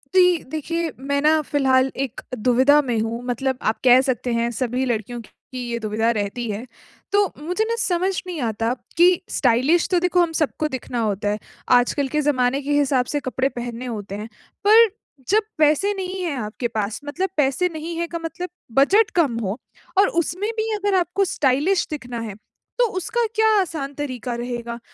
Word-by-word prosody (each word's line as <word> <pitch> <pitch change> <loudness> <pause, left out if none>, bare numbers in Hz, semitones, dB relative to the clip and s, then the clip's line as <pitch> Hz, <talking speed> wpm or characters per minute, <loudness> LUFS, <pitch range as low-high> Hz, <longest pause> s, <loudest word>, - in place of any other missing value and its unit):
जी, 360 -3 +5
देखिए 325 +2 -2
मैं 280 +1 -1
ना 310 +1 +4
फिलहाल 265 -3 +2
एक 255 - -9 0.2
दुविधा 260 +6 +4
में 245 -5 -1
हूँ 225 +2 -2
मतलब 255 +1 -1
आप 220 - 0
कह 255 0 +7
सकते 250 -2 -1
हैं 235 0 +1
सभी 250 +2 -1
लड़कियों 240 0 -2
की 255 +3 -12
ये 235 - -2
दुविधा 220 +1 0
रहती 220 +2 -3
है। 210 +4 -4 0.5
तो 405 0 +4
मुझे 360 +8 -1
ना 465 - +1
समझ 370 -1 +1 0.2
नहीं 350 -3 -4
आता 225 0 0 0.2
कि 355 +1 +5
स्टाइलिश 265 +7 +2
तो 360 - +4
देखो 360 0 +2
हम 340 -1 +1
सबको 310 0 0
दिखना 255 -3 -4
होता 205 -2 0
है, 210 +1 -1 0.3
आजकल 250 +3 +3
के 300 +3 0
ज़माने 270 -2 +1
के 285 +1 -4
हिसाब 265 -3 +2
से - - +2
कपड़े 260 0 -1
पहनने 240 -1 -6
होते 205 -5 -5
हैं, 210 +2 -6 0.4
पर 450 +2 +8 0.4
जब 430 +2 +4
पैसे 310 +7 +3
नहीं 380 -1 -4
है 330 -5 -2
आपके 225 +3 -3
पास 215 -2 -3
मतलब 365 +6 -2
पैसे 295 +5 +2
नहीं 320 +2 -5
है 340 0 -1
का 335 0 -5
मतलब 355 +2 -5 0.3
बजट 405 +10 +5
कम 290 -10 +2
हो 195 +2 -2 0.4
और 395 +1 +6
उसमें 370 +6 -3
भी 445 0 -1
अगर 405 -1 0
आपको 370 +3 0
स्टाइलिश 300 +4 +1
दिखना 245 -5 -5
है, 220 -3 -5
तो 480 - -4
उसका 470 +6 0
क्या 440 0 +4
आसान 305 -6 -4
तरीका 255 -4 -4
रहेगा? 235 -1 -5
275 Hz, 185 wpm, -22 LUFS, 240-345 Hz, 0.5 s, पर